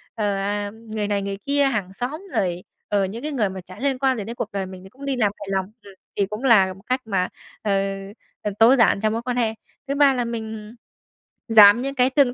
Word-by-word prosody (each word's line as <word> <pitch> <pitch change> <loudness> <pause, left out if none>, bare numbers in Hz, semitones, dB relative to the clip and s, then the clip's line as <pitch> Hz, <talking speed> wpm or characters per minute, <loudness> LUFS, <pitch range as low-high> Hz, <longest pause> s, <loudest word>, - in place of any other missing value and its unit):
ờ, 205 -3 0
ờ, 205 +1 -2
người 220 -2 -5
này 200 -1 0
người 195 0 -4
kia, 280 +6 +1
hàng 210 -8 -1
xóm 255 - -4 0.2
rồi, 180 -1 0 0.2
ờ, 200 -1 +1
những 210 +5 -6
cái 305 - -3
người 220 -8 0
mà 190 0 -7
chả 185 +2 -13
liên 270 0 0
quan 265 -2 +2
gì 210 - -3
đến 230 +3 -6
cuộc 210 - -4
đời 195 -1 -2
mình 185 0 -10
thì 190 - -12
cũng 270 +5 -11
đi 275 -1 0
làm 215 -5 +2
hài 205 - -8
lòng. 190 -1 0 0.2
Ừm, 200 -1 -13 0.2
thì 200 - +2
cũng 210 +5 -7
là 195 -7 +5
một 195 - -17
cách 255 +1 0
mà, 190 -4 0 0.3
ờ, 210 - -1 0.7
ờ, 210 - -2
tối 235 +4 +7
giản 230 -5 +4
trong 215 0 +1
mối 230 - -2
quan 250 0 -3
hệ. 225 -2 +1 0.3
Thứ 280 - -1
ba 280 -1 +5
là 245 -2 -1
mình 220 -1 -6 0.7
giảm 220 0 +8
những 275 +1 -3
cái 255 0 +4
tương 265 -3 +3
220 Hz, 250 wpm, -23 LUFS, 200-250 Hz, 0.7 s, giảm